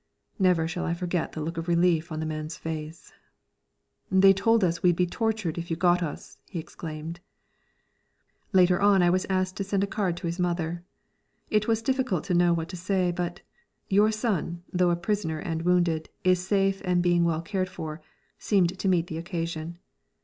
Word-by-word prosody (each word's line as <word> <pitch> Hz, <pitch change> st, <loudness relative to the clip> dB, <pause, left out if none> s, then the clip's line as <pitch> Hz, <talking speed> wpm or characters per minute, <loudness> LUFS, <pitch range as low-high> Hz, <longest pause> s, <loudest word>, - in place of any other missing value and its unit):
Never 180 Hz, -4 st, +3 dB
shall 175 Hz, +2 st, -3 dB
I 170 Hz, -, -1 dB
forget 175 Hz, -1 st, -2 dB
the 155 Hz, -, -5 dB
look 165 Hz, +2 st, -4 dB
of 165 Hz, +1 st, -4 dB
relief 170 Hz, -1 st, +2 dB
on 155 Hz, -, -3 dB
the 160 Hz, -, -2 dB
man's 155 Hz, 0 st, -4 dB
face. 160 Hz, 0 st, -7 dB, 1.0 s
"They 195 Hz, +1 st, +7 dB
told 225 Hz, +2 st, +2 dB
us 170 Hz, -2 st, +1 dB
we'd 175 Hz, -2 st, +4 dB
be 180 Hz, -, +2 dB
tortured 215 Hz, -3 st, -2 dB
if 170 Hz, -, -6 dB
you 165 Hz, -, -1 dB
got 175 Hz, +1 st, +3 dB
us!" 160 Hz, -4 st, -6 dB
he 185 Hz, -, -6 dB
exclaimed. 160 Hz, +1 st, -7 dB, 1.3 s
Later 185 Hz, -1 st, +4 dB
on 200 Hz, -2 st, +5 dB
I 175 Hz, -, +4 dB
was 185 Hz, +1 st, 0 dB
asked 185 Hz, -1 st, 0 dB
to 195 Hz, -, -1 dB
send 195 Hz, 0 st, 0 dB
a -, -, +3 dB
card 195 Hz, -3 st, -1 dB
to 175 Hz, -, -6 dB
his 170 Hz, +2 st, -3 dB
mother. 175 Hz, -1 st, -1 dB, 0.7 s
It 210 Hz, 0 st, +2 dB
was 225 Hz, 0 st, +1 dB
difficult 255 Hz, -, 0 dB
to -, -, -2 dB
know 175 Hz, 0 st, +4 dB
what 165 Hz, -1 st, -1 dB
to 185 Hz, -, -6 dB
say, 180 Hz, 0 st, 0 dB
but 175 Hz, 0 st, -4 dB, 0.5 s
"Your 205 Hz, +2 st, +4 dB
son, 195 Hz, -6 st, -2 dB
though 180 Hz, -1 st, +3 dB
a 175 Hz, -, +2 dB
prisoner 175 Hz, -2 st, -2 dB
and 160 Hz, +1 st, -3 dB
wounded, 170 Hz, -2 st, +1 dB
is 185 Hz, -1 st, +3 dB
safe 195 Hz, -1 st, +1 dB
and 180 Hz, -2 st, +1 dB
being 175 Hz, -1 st, +3 dB
well 165 Hz, -1 st, 0 dB
cared 185 Hz, +1 st, -2 dB
for," 155 Hz, -2 st, -7 dB, 0.4 s
seemed 185 Hz, -3 st, +1 dB
to 195 Hz, -, -1 dB
meet 175 Hz, -3 st, +3 dB
the 160 Hz, -2 st, -5 dB
occasion. 165 Hz, -1 st, -4 dB
175 Hz, 190 wpm, -27 LUFS, 165-190 Hz, 1.3 s, They